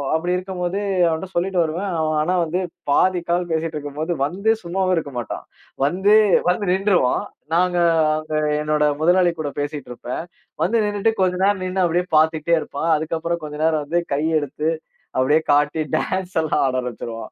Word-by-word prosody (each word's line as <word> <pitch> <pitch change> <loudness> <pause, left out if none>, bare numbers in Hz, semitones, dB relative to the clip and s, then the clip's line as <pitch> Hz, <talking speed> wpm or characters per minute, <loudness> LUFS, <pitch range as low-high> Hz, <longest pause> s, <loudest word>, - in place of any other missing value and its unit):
அப்டி 175 +3 0
இருக்கும் 185 -1 -6
போது 185 +3 -1 0.3
அவன்ட்ட 165 +4 -3
சொல்லிட்டு 180 +1 0
வருவேன். 175 +5 -3
அவன் 155 -1 0
ஆனா 180 +4 0
வந்து, 175 +4 -2 0.3
பாதி 185 +4 +3
கால் 175 0 0
பேசிட்டு 160 0 -2
இருக்கும்போது 150 +3 -4
வந்து 195 +9 -1
சும்மாவே 185 +1 0
இருக்க 140 -4 -3
மாட்டான். 120 - -6 0.4
வந்து 190 +7 +3 0.3
வந்து 180 0 +1
நின்னுருவான். 190 -9 +2 0.3
நாங்க 180 0 +2 0.4
அங்க 155 0 -6 0.3
என்னோட 150 0 +1 0.2
முதலாளி 175 +1 +4
கூட 150 -2 -2
பேசிட்டுருப்பேன். 145 -1 -5 0.4
வந்து 225 +7 +2
நின்னுட்டு 205 +2 +1
கொஞ்ச 180 -1 +2
நேரம் 195 -2 +2
நின்னு 185 0 0
அப்டியே 175 +2 +1
பார்த்துட்டே 160 +1 +3
இருப்பான். 160 +4 -2
அதுக்கப்புறம் 165 +2 -2
கொஞ்ச 150 -1 -6
நேரம் 155 -2 +1
வந்து 170 +4 +1
கை 145 +2 0 0.2
எடுத்து 150 +2 -2 0.5
அப்டியே 145 +4 +4
காட்டி 145 +2 +2
டான்ஸ்லாம் 180 -4 0
ஆட 130 - -1
ஆரம்பிச்சிருவான். 115 -2 -6
165 Hz, 155 wpm, -21 LUFS, 150-185 Hz, 0.5 s, முதலாளி